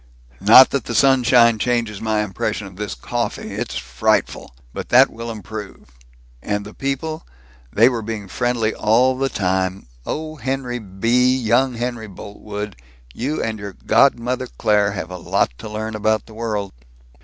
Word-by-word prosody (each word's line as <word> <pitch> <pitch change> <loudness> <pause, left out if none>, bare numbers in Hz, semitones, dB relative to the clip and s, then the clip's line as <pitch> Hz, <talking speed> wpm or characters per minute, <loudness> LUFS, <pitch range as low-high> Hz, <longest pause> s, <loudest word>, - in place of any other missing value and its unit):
Not 115 +7 +8
that 140 -5 -1
the 120 - -4
sunshine 125 -4 +5
changes 115 -3 -1
my 110 -1 0
impression 105 +1 -3
of 95 -1 -11
this 105 -4 -5
coffee. 60 - -4
It's - - -4
frightful! - - -1 0.2
But - - -6
that - - +6
will 115 +1 -7
improve. 105 - -8 0.5
And 105 +4 -2
the 105 - -10
people 145 +4 -3 0.5
they 115 +3 +5
were 120 -3 0
being 110 -2 -5
friendly, 120 0 0
all 120 +5 +3
the 135 +1 -1
time. 95 - -1 0.2
Oh, 155 - -5
Henry 130 -3 -3
B., 115 +6 +1
young 125 +2 +2
Henry 120 -1 -4
Boltwood, 105 +1 -7 0.4
you 140 +6 -2
and 110 -1 -3
your 100 -1 -7
godmother 125 +3 +2
Claire 105 -2 +2
have 95 -2 -5
a 90 - -5
lot 80 - 0
to 110 - -7
learn 110 +1 -4
about 110 0 0
the 110 - -14
world!" 110 -3 -3
110 Hz, 155 wpm, -20 LUFS, 105-125 Hz, 0.5 s, Not